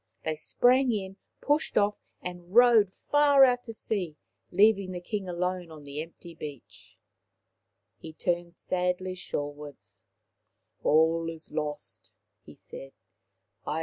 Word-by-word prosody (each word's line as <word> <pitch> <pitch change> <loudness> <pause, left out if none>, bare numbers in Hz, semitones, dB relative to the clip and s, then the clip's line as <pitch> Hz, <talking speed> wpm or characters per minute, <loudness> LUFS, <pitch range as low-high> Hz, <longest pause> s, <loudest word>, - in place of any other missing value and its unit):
They 155 - 0
sprang 250 - +3
in, 195 -3 -4 0.2
pushed 295 +2 +1
off, 205 0 +4 0.3
and 180 +1 -8
rowed 235 -5 +6 0.2
far 290 -2 +6
out 245 -1 +4
to 225 - -7
sea, 180 -9 -3 0.3
leaving 200 0 +3
the 180 - -4
King 190 +1 -4
alone 180 0 -2
on 155 -2 -11
the 145 +1 -5
empty 165 +1 -11
beach. 150 -5 -11 1.0
He 160 - -9
turned 175 +1 -2
sadly 180 0 -1
shorewards. 145 - -7 0.4
" - - -47
All 165 +2 +3
is 165 -1 -7
lost," 150 -1 -5 0.3
he - - -14
said. - - -11
180 Hz, 125 wpm, -28 LUFS, 160-215 Hz, 1.0 s, rowed